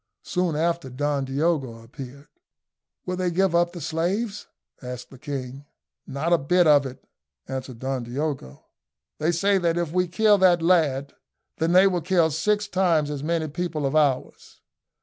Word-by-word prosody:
Soon 180 -3 -1
after 165 -2 -1
Don 140 +1 -1
Diogo 135 -4 -1
appeared. 135 +4 -11 0.8
"Will 180 - -2
they 180 0 0
give 185 +1 +1
up 175 0 +2
the 175 - -8
slaves?" 180 +8 -2 0.3
asked 125 -1 -8
the 135 - -13
king. 135 -1 -6 0.4
"Not 155 +6 -1
a 170 - +4
bit 175 +6 +3
of 145 -3 +5
it," 130 - -11 0.4
answered 130 -2 -6
Don 130 +1 -3
Diogo. 125 - -5 0.5
"They 155 +3 +1
say 195 +4 +2
that 170 -1 0
if 170 -3 -1
we 180 +1 +1
kill 210 +3 +3
that 175 -3 +4
lad, 150 -6 +2 0.4
then 165 +1 +1
they 185 +2 +7
will 180 -3 +1
kill 170 -1 +2
six 210 +7 0
times 170 -7 +1
as 145 -2 -4
many 160 +1 -1
people 155 -1 -3
of 135 - -1
ours." 145 -4 0
160 Hz, 165 wpm, -24 LUFS, 135-175 Hz, 0.8 s, they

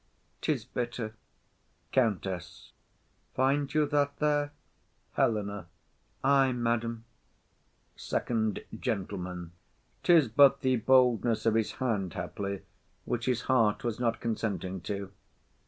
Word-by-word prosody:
_ - - -41
'Tis - - -1
bitter. 120 -2 -4 0.8
COUNTESS. 95 -8 -1 0.6
Find 135 +2 +2
you 155 0 +3
that 145 -1 0
there? 145 -1 +1 0.6
HELENA. 100 -4 0 0.6
Ay, 135 -1 +4
madam. 115 -1 -1 0.9
FIRST 110 -3 -1 0.2
GENTLEMAN. 90 -6 -3 0.5
'Tis 165 -6 +5
but 140 +4 +5
the 130 -2 +2
boldness 120 -2 +3
of 115 - +4
his 110 -1 +1
hand 105 - -2
haply, 100 +2 -4 0.4
which 120 0 -2
his 125 -2 +1
heart 115 -5 +2
was 120 -2 -2
not 115 -2 0
consenting 100 -5 -2
to. 100 +2 -4
115 Hz, 105 wpm, -30 LUFS, 100-130 Hz, 0.9 s, Tis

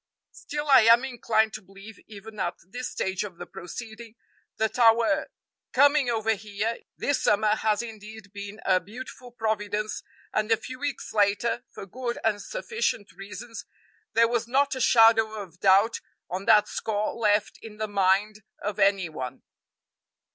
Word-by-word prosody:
Still 295 0 -6
I 275 - +8
am 230 +3 +6
inclined 220 -4 +1
to 215 - -6
believe, 195 +3 -14
even 215 0 -11
at 175 - -1
this 245 +6 -5
stage 190 +2 -2
of 190 -5 -8
the - - -7
proceeding, 220 +5 -9 0.4
that 220 +2 -1
our 235 +5 +4 0.5
coming 285 -1 +4
over 225 -1 +1
here 210 +2 -3 0.2
this 285 -2 0
summer 210 +1 +3
has 215 +1 +1
indeed 215 -2 -10
been 205 +1 -8
a 185 -1 +4
beautiful 245 +6 -10
providence 215 -2 -2 0.3
and 215 +1 0
a 225 - +5
few 255 +3 -9
weeks 290 -1 -4
later, 210 +4 +1
for - - -9
good 240 +4 -4
and 210 -2 +1
sufficient 465 - -3
reasons, 215 +4 -9 0.5
there 230 0 +5
was 235 0 -1
not 275 +3 +2
a 260 - -4
shadow 225 -2 +5
of 185 -5 -9
doubt 200 +4 +4 0.3
on 190 +2 -4
that 210 -2 +5
score 215 -1 -2
left 210 -2 +1
in 215 -2 -11
the 215 0 -2
mind 205 +2 +1 0.2
of 210 -1 -4
any 195 -2 +3
one." 130 -5 -7
220 Hz, 155 wpm, -26 LUFS, 205-235 Hz, 0.5 s, I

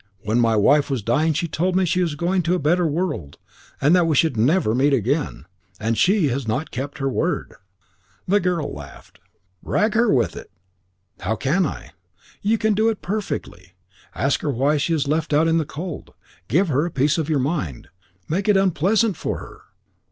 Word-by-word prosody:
When 110 +3 +1
my 115 -2 +3
wife 140 +8 +3
was 130 -6 -2
dying 150 +9 +2
she 170 +3 -1
told 180 +4 -1
me 190 0 +3
she 180 +2 +1
was 165 -4 -1
going 180 +4 0
to 175 +2 +1
a - - +1
better 170 +2 +2
world, 150 - -3 0.4
and 150 +6 +4
that 175 -2 +3
we 155 - +1
should 160 -1 +2
never 125 +2 +2
meet 140 +4 +2
again. 85 - -2 0.3
And 115 +1 0
she 185 - +3
has 130 -1 -3
not 135 +8 -2
kept 140 +4 -5
her 135 -1 -2
word." 150 +4 -1 0.7
The 200 +3 +3
girl 180 -5 -1
laughed. 70 -1 -12 0.4
"Rag 215 +2 0
her 230 0 +3
with 120 -4 +1
it." - - -9 0.7
"How 105 +5 -1
can 155 - +1
I?" - - -8 0.5
"You 220 +3 +2
can 220 0 +1
do 220 +2 +2
it 220 - -4
perfectly. 175 - -5 0.4
Ask 135 0 0
her 150 - -2
why 140 +3 +1
she 155 +4 -1
is 150 -3 0
left 155 +1 -1
out 155 +3 +4
in 165 0 +3
the 160 - -1
cold. 160 +3 -7 0.3
Give 170 - +2
her 145 +1 +2
a - - -4
piece 150 +1 +1
of 160 -1 -2
your 155 - +2
mind. 130 - -3 0.4
Make 190 +6 -1
it 205 - +5
unpleasant 195 +2 +2
for - - -3
her. - - -11
155 Hz, 195 wpm, -22 LUFS, 135-180 Hz, 0.7 s, it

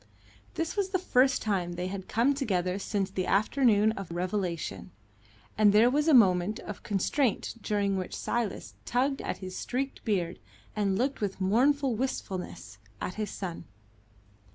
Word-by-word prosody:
This 330 -2 -2
was 400 -2 0
the 375 - +1
first 265 -7 +2
time 185 -5 -1
they 180 +1 -3
had 190 0 -5
come 240 +6 +2
together 190 -9 -1
since 195 -1 -2
the 185 -1 -2
afternoon 215 0 +3
of 195 -5 -6
revelation, 170 - -3 0.7
and 210 -1 +7
there 225 +4 +6
was 295 +3 +1
a 315 - +5
moment 195 -1 +4
of 210 - -7
constraint 215 +5 0
during 200 -2 0
which 185 - -4
Silas 235 -4 -2
tugged 270 +3 0
at - - -3
his 185 0 -6
streaked 265 +2 -3
beard 180 -6 -1 0.4
and 200 -3 +1
looked 265 +3 -1
with 200 -2 -2
mournful 260 +7 +3
wistfulness 185 - -4 0.2
at 185 - -3
his 215 0 -3
son. 175 -4 -6
205 Hz, 155 wpm, -29 LUFS, 185-255 Hz, 0.7 s, and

